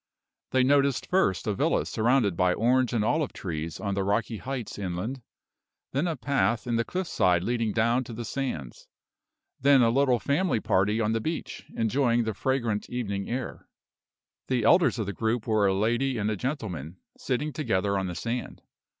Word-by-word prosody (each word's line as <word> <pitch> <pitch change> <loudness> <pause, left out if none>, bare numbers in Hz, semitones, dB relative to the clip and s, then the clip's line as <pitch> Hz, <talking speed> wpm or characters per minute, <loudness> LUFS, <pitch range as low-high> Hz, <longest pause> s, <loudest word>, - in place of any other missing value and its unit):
They 130 -1 +3
noticed 140 -1 +3
first 180 - +1
a 105 - 0
villa 150 +10 +1
surrounded 115 -4 +2
by 90 +1 +2
orange 125 +2 +2
and 110 -3 +1
olive 150 +3 0
trees 80 -3 -5
on 100 -2 -2
the 100 0 0
rocky 105 +3 0
heights 125 -2 -5
inland; 100 +8 -4 0.7
then 140 +7 0
a 165 - -1
path 130 -4 0
in 120 -1 -1
the 115 - +2
cliff 185 +9 -3
side 90 - +2
leading 115 0 0
down 115 +4 +2
to 120 - -8
the 115 +1 -5
sands; 80 - -4 0.7
then 140 -1 +5
a 115 - +4
little 130 -1 +3
family 140 - +1
party 105 +2 +1
on 110 -1 +1
the 115 0 0
beach, 160 +7 -5
enjoying 120 +1 +2
the 110 -1 -2
fragrant 115 -2 -1
evening 100 -5 -3
air. 125 +1 -5 0.8
The 125 -3 0
elders 175 - +4
of 110 - -1
the 100 - -4
group 110 +1 -1
were 110 -3 +2
a 95 - +2
lady 120 +6 +1
and 105 0 0
gentleman, 95 - -4 0.2
sitting 140 +3 -2
together 100 -8 0
on 95 -1 -1
the 90 - -5
sand. 115 +8 -4
115 Hz, 175 wpm, -27 LUFS, 100-130 Hz, 0.8 s, then